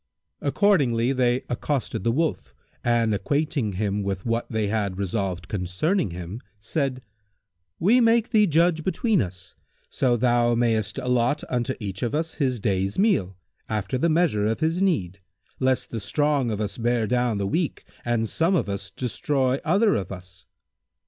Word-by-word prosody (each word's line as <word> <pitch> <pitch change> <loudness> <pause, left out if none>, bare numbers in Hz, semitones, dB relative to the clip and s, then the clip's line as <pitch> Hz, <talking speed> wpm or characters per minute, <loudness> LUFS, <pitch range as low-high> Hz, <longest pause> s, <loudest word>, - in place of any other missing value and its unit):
Accordingly 140 - +2
they 125 -1 +1
accosted 120 -4 -2
the 115 - +2
Wolf 155 +5 -1 0.3
and 115 -2 +2
acquainting 140 -1 -1
him 100 +1 -1
with 95 -1 -3
what 115 0 -1
they 110 -2 -1
had 100 -3 -1
resolved 95 -2 -2
concerning 105 - -1
him 90 +6 -7 0.2
said, 130 +3 -2 0.7
"We 220 +9 +4
make 230 0 +3
thee 210 -3 +5
judge 165 0 +2
between 205 +2 +1
us, 90 -1 -6 0.4
so 125 -2 +2
thou 120 0 +3
mayst 110 -3 0
allot 125 +1 +1
unto 125 +1 -1
each 100 -3 -5
of 120 +3 -1
us 160 +1 -2
his 130 -3 +1
day's 95 -1 -1
meat, 195 - +2 0.4
after 110 +3 -2
the 170 - +2
measure 155 -11 +2
of 110 - -1
his 165 +3 0
need, 100 - 0 0.4
lest 130 -1 0
the 115 - -3
strong 140 +4 +1
of 105 -2 -2
us 105 +1 -3
bear 120 -1 +1
down 120 -1 +1
the 100 - -1
weak 160 - -2 0.2
and 120 -2 0
some 165 - +1
of 165 - +1
us 100 -1 -4
destroy 130 +4 0
other 200 +7 +3
of 95 -3 -2
us." 90 0 -10
120 Hz, 160 wpm, -24 LUFS, 105-150 Hz, 0.7 s, thee